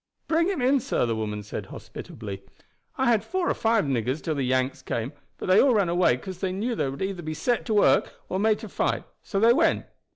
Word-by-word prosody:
"Bring 330 +1 +2
him 370 -10 -1
in, 270 +2 +4
sir," 230 - 0
the 115 -1 -1
woman 105 -1 -3
said 105 - -6
hospitably. 100 -3 -8 0.6
"I 265 - +1
had 220 -3 +2
four 360 +8 -1
or - - +2
five 225 -4 +2
niggers 130 +1 -1
till 160 - -1
the 140 - -2
Yanks 130 +1 0
came, 120 +5 -3 0.2
but - - -6
they 185 +2 +6
all 265 -4 +4
ran 200 -5 +2
away 170 -8 +3
'cause 185 +7 -8
they 190 -1 -1
knew 215 +6 -2
they 140 - -1
would 135 +7 -4
either 190 -2 -3
be 155 -1 -4
set 240 +12 0
to 220 - +1
work 205 - +3
or 185 - -2
made 215 +1 +3
to - - -6
fight; - - -1 0.2
so 195 - -2
they 230 +3 +6
went. 330 +4 +2
190 Hz, 235 wpm, -26 LUFS, -, 0.6 s, they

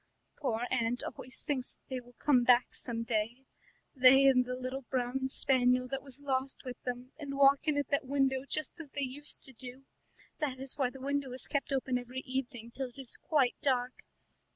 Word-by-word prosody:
"Poor 245 -5 -1
aunt 235 +1 0
always 255 - -5
thinks 265 -4 -2
that - - -40
they 260 -1 -3
will 245 0 -19
come 255 -5 +4
back 245 0 +4
some 230 -2 -1
day, 230 +3 -2 0.5
they 265 +1 +7
and 255 -2 +5
the 250 0 -3
little 255 +1 -4
brown 260 +1 -1
spaniel 255 -1 +4
that 270 +1 -3
was 275 0 -10
lost 270 -1 -2
with 250 -1 -7
them, 250 +1 -5
and 280 -2 -5
walk 275 +2 +5
in 300 -2 +2
at 285 -2 -1
that 280 -2 0
window 265 -1 +1
just 310 +3 -3
as 320 -4 -8
they 285 - 0
used 280 +3 -3
to 265 - -11
do. 255 +2 -10 0.5
That 275 -4 -2
is 265 0 -1
why 265 -4 +1
the 270 - -11
window 280 0 -1
is 255 - -3
kept 280 -1 -2
open 260 -2 0
every 250 +1 -6
evening 245 -3 -4
till 265 +1 -4
it 245 - -22
is 265 -3 -8
quite 275 -6 +2
dusk. 255 -2 0
260 Hz, 200 wpm, -32 LUFS, 250-275 Hz, 0.5 s, they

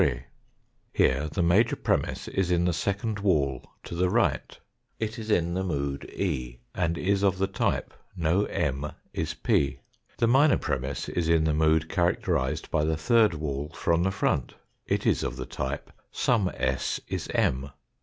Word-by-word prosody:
Here 70 +4 +2
the 85 - 0
major 100 +8 +4
premiss - - -1
is 95 -2 -1
in 85 -1 +2
the 90 - +2
second 100 +5 -1
wall 70 -10 +1 0.2
to - - -8
the 90 +2 +1
right - - 0 0.4
it 110 +1 -3
is 110 -1 -7
in 85 -4 +2
the 95 +1 -1
mood 70 -6 -3
E 65 -10 -2 0.2
and 85 0 0
is 100 +1 +1
of 95 -2 +2
the 95 - +2
type 95 -1 -1 0.2
no 85 +3 +2
M 70 0 -2 0.2
is - - -2
P. 70 -1 +1 0.4
The 115 - +3
minor 135 +5 +5
premiss 65 0 -3
is 85 -2 -1
in 80 -1 +4
the 80 -1 +2
mood 80 +1 +3
characterised 80 -4 0
by 75 -2 +2
the 80 0 0
third 105 +3 +4
wall 75 -1 -3
from 85 0 +1
the 95 - +2
front. 95 - -1 0.3
It - - 0
is - - +3
of - - -2
the - - -5
type 65 +2 -4 0.2
some 105 -7 +2
s 65 0 -1
is - - -3
M. 65 +2 +1
85 Hz, 170 wpm, -27 LUFS, 70-95 Hz, 0.4 s, minor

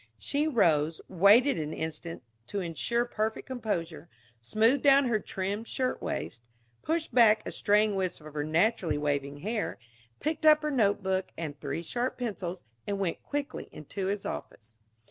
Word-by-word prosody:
She 290 +2 0
rose, 165 - +2
waited 200 - +5
an 155 0 -3
instant 160 -1 -5 0.2
to 200 - -3
insure 195 +7 -1
perfect 220 -2 -2
composure, 175 -10 -4 0.3
smoothed 225 - +2
down 280 -1 +6
her 230 -3 +1
trim 200 +2 -3
shirtwaist, 255 - -3 0.4
pushed 320 -3 -2
back 225 -3 +5
a - - -3
straying 210 0 +3
wisp 185 -2 -2
of 155 -1 -11
her 150 -1 -2
naturally 165 0 +1
wavy 145 -1 -1
hair, 215 +2 -2 0.4
picked 310 0 -2
up 305 -1 +6
her 300 - 0
notebook 200 -6 +1
and 150 -3 -5
three 165 - -4
sharp 245 +8 -2
pencils, 190 -7 -4 0.2
and 200 - -1
went 190 -4 -2
quietly 290 -1 -4
into 185 +6 -5
his 200 0 -2
office. 110 0 -7
200 Hz, 150 wpm, -29 LUFS, 165-240 Hz, 0.4 s, down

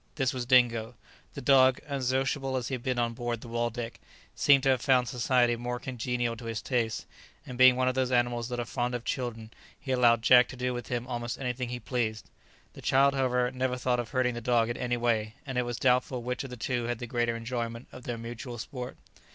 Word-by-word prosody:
This 135 -4 0
was 125 -2 -4
Dingo. 120 -2 +3 0.4
The - - -5
dog, 130 -1 +5
unsociable 135 0 -1
as 125 - -3
he - - -4
had 125 - -3
been 130 0 -1
on 120 -1 0
board 120 -1 -3
the - - -10
"Waldeck," 120 0 -3 0.3
seemed 140 -2 +4
to 135 - +3
have 130 -3 +3
found 125 -2 +3
society 120 +1 +2
more 120 +1 -4
congenial 120 -2 -2
to 120 - -10
his 115 -1 -3
tastes, 120 -4 -1 0.4
and 125 - -7
being 130 0 +7
one 130 0 +1
of 130 - +2
those 130 -1 0
animals 120 -1 +1
that 120 -1 -3
are 120 - -2
fond 125 +1 -2
of 120 - -5
children, 115 -3 -4 0.3
he 135 - -5
allowed 120 -3 +4
Jack 125 0 +7
to - - -9
do 125 0 -2
with 120 -2 -5
him 120 -1 -2
almost 120 -1 -4
anything 125 -2 -3
he 125 0 -4
pleased. 110 -3 -3 0.4
The - - -11
child, 140 +1 +4
however, 125 -2 +1
never 130 -1 -1
thought 125 -1 0
of 120 -2 -4
hurting 130 -2 +1
the 120 - -5
dog 120 -1 +2
in - - -4
any 120 -1 -1
way, 110 -2 0
and 135 -2 -5
it 125 - 0
was 120 -1 -3
doubtful 125 0 +1
which 125 +2 -3
of 135 - -7
the 125 - -8
two 120 0 -2
had 120 0 -2
the 120 - -6
greater 120 -1 0
enjoyment 115 0 -4
of 125 - -11
their 120 -1 -3
mutual 120 +2 -7
sport. 125 +1 -6
125 Hz, 230 wpm, -29 LUFS, 120-130 Hz, 0.4 s, being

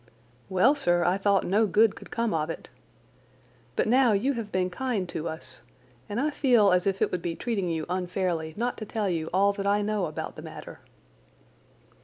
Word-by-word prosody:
"Well, 190 +8 +4
sir, 175 -12 +2
I 180 +3 +2
thought 200 0 +2
no 210 +4 +3
good 215 +1 +4
could - - -12
come 235 -2 -1
of 155 -1 -1
it. 165 - -7 1.1
But - - +1
now 245 0 +4
you 245 +8 +1
have 225 -4 -5
been 185 0 0
kind 220 -3 -2
to 165 +1 -3
us, 160 -5 -8 0.5
and 205 - -2
I 300 +3 +1
feel 240 -8 +4
as 180 +1 +2
if 195 0 +1
it - - 0
would 180 - -2
be 170 -1 -3
treating 200 -6 -2
you 160 -2 -2
unfairly 180 -3 -2
not 240 +2 -2
to 215 - -5
tell 215 -1 -2
you 165 -3 -2
all 200 +3 +3
that 200 0 -3
I 205 +1 +2
know 205 -3 0
about 155 - -6
the - - -7
matter." - - -10
195 Hz, 200 wpm, -27 LUFS, 175-220 Hz, 1.1 s, Well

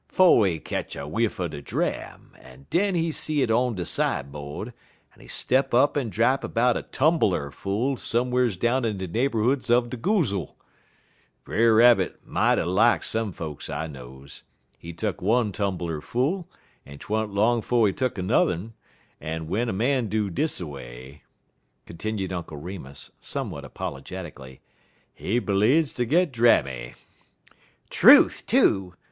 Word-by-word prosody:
" - - -47
'Fo' 185 -10 +5
he 90 -6 +1
ketch - - -5
a 70 0 -6
whiff 115 +7 -1
er 90 - -1
de 75 -3 -8
dram, 70 - -4
en 65 +1 -16
den 195 +2 +2
he 165 -1 0
see 150 -2 -1
it 115 - 0
on 120 +1 +1
de 90 -2 -4
side 70 +1 -1
bode, 75 +9 -7 0.4
en - - -24
he - - -15
step 130 -1 0
up 140 +4 +4
en 135 -6 -1
drap 115 +7 +2
'bout 120 +1 +3
a - - -2
tumbeler 130 - +1
full 110 - -2
some'rs 125 -3 0
down 120 +6 +1
in 110 -3 -1
de 95 0 -4
neighborhoods 120 +4 0
er 120 +1 +5
de 120 +1 -7
goozle. 115 - -1 0.9
Brer 115 0 +3
Rabbit 115 -5 +4
mighty - - +1
lak 95 +3 +3
some 110 -2 -1
folks 80 -4 -7
I 80 - -3
knows. 65 -2 -11 0.3
He 85 +5 -10
tuck 95 +3 -4
one 110 +3 +2
tumbeler 90 -6 -3
full, 150 - -2 0.3
en 70 0 -12
't - - -12
wa'n't 110 0 -1
long 110 +4 +2
'fo' 120 0 +2
he 100 - +1
tuck 130 +3 -2
'n'er'n, 95 +1 0 0.5
en 80 +1 -4
w'en 105 +9 -1
a - - 0
man 120 +4 0
do 105 -1 -1
dis 150 - 0
a 90 - -4
way," 65 -1 -10 0.6
continued 95 +2 -4
Uncle 85 -4 -6
Remus, 75 -4 -8
somewhat - - -5
apologetically, 70 -3 -8 0.5
"he 115 +5 -1
bleedz 120 +9 +2
ter 120 - 0
git 165 +6 +2
drammy." 70 - +2 1.0
"Truth, - - +6
too!" 95 -2 +2
105 Hz, 160 wpm, -25 LUFS, 80-120 Hz, 1.0 s, Truth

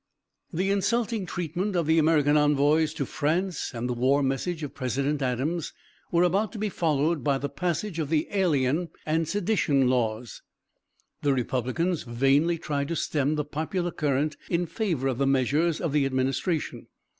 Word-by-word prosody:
The 190 +4 0
insulting 220 0 0
treatment 180 +4 -3
of 170 -2 +1
the 160 +1 +4
American 150 -2 +3
envoys 150 +1 +3
to - - -2
France 170 +4 -1
and 120 0 -4
the 125 - -1
war 130 +4 +2
message 150 +5 -2
of 145 - -5
President 140 +3 -1
Adams 135 +6 -1 0.4
were 170 0 +4
about 195 +4 +1
to - - -6
be 210 0 -1
followed 160 -2 0
by 140 -2 +2
the 140 +1 -3
passage 170 +4 -2
of 150 -3 -2
the 155 -1 +1
alien 165 -4 +1 0.2
and 160 +1 0
sedition 175 -9 +1
laws. 115 -2 -1 0.8
The 145 -1 +2
Republicans 130 +7 -1
vainly 135 +7 +2
tried 145 -3 -2
to 170 - -2
stem 150 -1 0
the 150 -1 -1
popular 165 +4 -2
current 150 0 0
in 175 0 +1
favor 170 - -1
of 130 -1 -1
the 140 - +2
measures 145 +5 +2
of 170 - -1
the 145 -1 +2
administration. 135 +5 -1
150 Hz, 165 wpm, -26 LUFS, 135-175 Hz, 0.8 s, the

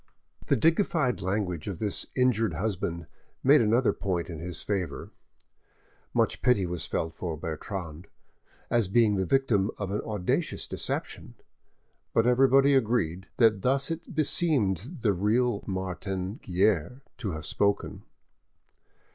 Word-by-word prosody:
The - - +4
dignified 160 - +2
language 95 -3 -2
of 100 -4 -4
this 105 +1 -1
injured 115 -8 +2
husband 85 -3 -2 0.4
made 145 +1 +6
another 115 +3 +3
point 90 -3 -3
in 80 - -6
his 90 +2 -5
favour. 100 -4 -3 1.0
Much - - +1
pity 115 -7 +3
was 85 -2 -4
felt 80 0 -2
for 85 -1 -4
Bertrande, 85 +1 -6 0.6
as 115 -4 +2
being 110 +1 +3
the 95 -2 -1
victim 115 -6 +2
of 100 -2 -4
an 105 - -1
audacious 105 -5 -2
deception; - - -4 0.8
but 115 - +4
everybody 135 +3 +5
agreed 105 -8 +1
that 110 -4 +4
thus 135 - +1
it 165 -1 -6
beseemed 140 - +1
the 105 -3 +3
real 105 +4 +1
Martin 95 +1 -4
Guerre 95 - 0 0.2
to 105 -7 -3
have 80 0 -6
spoken. 100 0 0
105 Hz, 130 wpm, -28 LUFS, 90-125 Hz, 1.0 s, made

